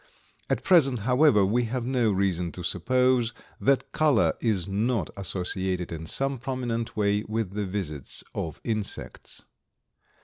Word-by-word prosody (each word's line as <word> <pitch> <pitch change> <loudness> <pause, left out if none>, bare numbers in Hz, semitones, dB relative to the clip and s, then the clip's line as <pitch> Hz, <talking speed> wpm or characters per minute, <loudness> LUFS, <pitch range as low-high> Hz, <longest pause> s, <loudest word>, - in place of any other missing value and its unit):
At - - 0
present, 135 - +4
however, 125 -2 +4
we 120 +5 +1
have 120 +1 -3
no 125 -4 +2
reason 95 -3 0
to 90 - -7
suppose 120 +6 +1 0.2
that 135 -1 +2
color 150 -7 +3
is 100 -6 +1
not 105 -1 0
associated 95 -1 -2
in 80 -1 -6
some 135 +4 -1
prominent 120 -3 -3
way 105 0 +2
with 110 -3 -2
the 105 0 -2
visits 85 -8 -4
of 80 -3 -4
insects. 110 -3 -5
110 Hz, 135 wpm, -27 LUFS, 95-125 Hz, 0.2 s, present